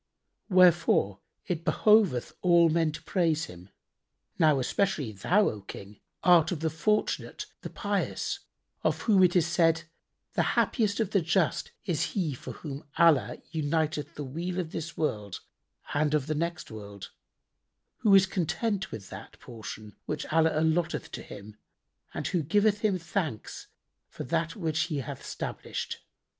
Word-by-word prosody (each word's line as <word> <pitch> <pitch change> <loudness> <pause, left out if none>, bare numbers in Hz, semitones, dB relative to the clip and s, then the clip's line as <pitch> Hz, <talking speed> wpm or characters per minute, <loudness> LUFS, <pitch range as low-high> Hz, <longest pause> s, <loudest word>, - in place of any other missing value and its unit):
Wherefore 175 - +4 0.3
it 170 -4 -3
behoveth 200 - +3
all 170 -2 +5
men 160 -1 +2
to - - -8
praise 165 -4 +1
Him. 90 +2 -12 0.7
Now, 155 -4 +5
especially 150 - 0
thou, 180 - +2
O 105 - -7
King, 100 +1 -10 0.2
art 170 -2 +6
of 165 -4 -3
the 160 -1 0
fortunate, 190 +7 -1 0.2
the - - -6
pious, - - -2 0.4
of - - 0
whom 205 -4 +4
it 180 -1 +5
is 175 -3 +4
said, 165 0 +2 0.5
'The - - +2 0.2
happiest 215 -4 +2
of 215 -3 0
the 195 - +3
just 165 +1 0
is 170 -6 -1
he 165 -7 0
for 125 - -8
whom 145 -2 -7
Allah 140 -9 +4
uniteth 155 -1 -1
the 145 - -5
weal 170 +7 -4
of 165 -3 -3
this 165 0 -5
world 105 - -2 0.5
and 150 +1 +2
of 145 -3 0
the 155 - -1
next 170 -1 -3
world; 100 -2 -9 0.9
who 205 -2 +5
is 190 -1 +7
content 190 +3 -1
with 105 -3 -8
that - - -10
portion 110 -3 -9
which - - -3
Allah 160 -1 +3
allotteth 160 +2 0
to - - -6
him 105 +1 -11 0.5
and - - -5
who 175 - 0
giveth 205 +7 +2
Him 205 -4 +1
thanks 165 - -4 0.4
for - - -7
that 165 +4 -1
which 160 -4 0
He 145 -4 -1
hath - - -7
stablished.' - - -5
160 Hz, 150 wpm, -28 LUFS, 145-180 Hz, 0.9 s, is